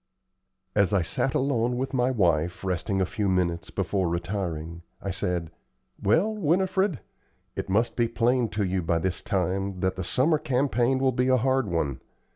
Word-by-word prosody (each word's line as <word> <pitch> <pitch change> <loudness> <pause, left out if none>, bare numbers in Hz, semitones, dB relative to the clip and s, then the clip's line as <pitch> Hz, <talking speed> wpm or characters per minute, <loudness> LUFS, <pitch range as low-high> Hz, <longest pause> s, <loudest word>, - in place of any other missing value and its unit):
As 100 0 +2
I 95 -4 +3
sat 130 +10 -1
alone 125 -3 +1
with 130 +2 -3
my 125 -1 +2
wife, 90 -7 +1
resting 95 +2 -1
a - - +3
few 100 +2 -1
minutes 90 -2 0
before 95 -4 -1
retiring, 85 -2 -3 0.2
I 100 - -3
said: 90 -3 -2 0.5
"Well, 165 - +3
Winifred, 190 - +1 0.5
it - - -4
must 115 +4 +1
be 120 -1 +2
plain 120 +1 +1
to 105 0 -1
you 95 -1 0
by 85 0 +1
this 90 +1 -2
time 95 0 -1
that 95 0 0
the 95 - -2
summer 150 - +2
campaign 130 -3 +1
will 130 0 +2
be 125 +1 +1
a 130 0 +4
hard 130 0 +1
one. 80 -7 -1
100 Hz, 170 wpm, -26 LUFS, 90-130 Hz, 0.5 s, a